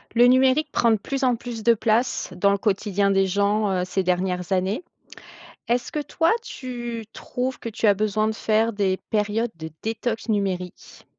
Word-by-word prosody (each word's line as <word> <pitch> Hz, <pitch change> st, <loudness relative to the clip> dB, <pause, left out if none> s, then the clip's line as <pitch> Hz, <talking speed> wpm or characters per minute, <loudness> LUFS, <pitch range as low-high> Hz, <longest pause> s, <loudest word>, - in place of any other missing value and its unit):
Le 240 Hz, +1 st, +7 dB
numérique 260 Hz, +4 st, +4 dB
prend 235 Hz, -, +2 dB
de 225 Hz, -, +5 dB
plus 270 Hz, +6 st, -4 dB
en 250 Hz, -2 st, +3 dB
plus 235 Hz, -1 st, -7 dB
de 235 Hz, +1 st, +4 dB
place 220 Hz, -2 st, 0 dB
dans 200 Hz, +3 st, +3 dB
le 200 Hz, -, +2 dB
quotidien 200 Hz, -1 st, +1 dB
des 195 Hz, 0 st, +3 dB
gens, 205 Hz, +2 st, +1 dB
heu, 180 Hz, -1 st, 0 dB
ces 185 Hz, +1 st, -1 dB
dernières 180 Hz, 0 st, -1 dB
années. 190 Hz, -, 0 dB, 0.8 s
Est-ce 240 Hz, +1 st, 0 dB
que 300 Hz, -, -2 dB
toi 325 Hz, +3 st, +1 dB
tu 240 Hz, -, -6 dB
trouves 255 Hz, +1 st, -4 dB
que -, -, -7 dB
tu 225 Hz, 0 st, 0 dB
as 205 Hz, -, +7 dB
besoin 215 Hz, +1 st, 0 dB
de 220 Hz, -, -3 dB
faire 220 Hz, +1 st, +1 dB
des 195 Hz, -3 st, 0 dB
périodes 215 Hz, +2 st, 0 dB
de 160 Hz, 0 st, -6 dB
détox 225 Hz, +1 st, -3 dB
numérique? 190 Hz, -4 st, -3 dB
215 Hz, 180 wpm, -24 LUFS, 195-240 Hz, 0.8 s, Le